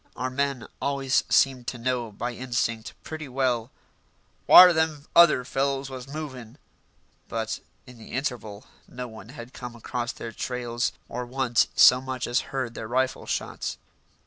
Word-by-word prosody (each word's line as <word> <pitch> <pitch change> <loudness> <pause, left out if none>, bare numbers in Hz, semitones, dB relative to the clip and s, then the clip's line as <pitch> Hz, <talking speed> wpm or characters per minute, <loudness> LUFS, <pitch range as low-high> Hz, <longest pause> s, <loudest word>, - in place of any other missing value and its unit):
Our 130 0 -3
men 140 -2 -1 0.2
always 135 -2 +1
seemed 130 -3 +3
to 125 - -3
know 120 -1 -2
by 120 +4 -4
instinct 115 -2 -2
pretty 155 -3 -7
well 125 -3 0 0.8
"whar 180 -1 +10
them 160 -2 0
other 160 -7 +6
fellows 135 0 -1
was 130 -1 -7
movin'," 130 -5 -7 0.7
but 110 -1 -3 0.3
in 125 -3 -14
the 110 - -12
interval 120 -6 -4 0.2
no 125 0 -7
one 110 0 -12
had 125 -2 -10
come 125 -1 -8
across 120 +1 -4
their 115 - -7
trails, 120 0 -2 0.2
or 125 +1 -4
once 125 -2 +2
so 125 0 +7
much 130 -1 -4
as 120 +2 +1
heard 130 -3 -3
their 110 - -6
rifle 130 +2 -1
shots. - - -3
125 Hz, 150 wpm, -26 LUFS, 120-135 Hz, 0.8 s, whar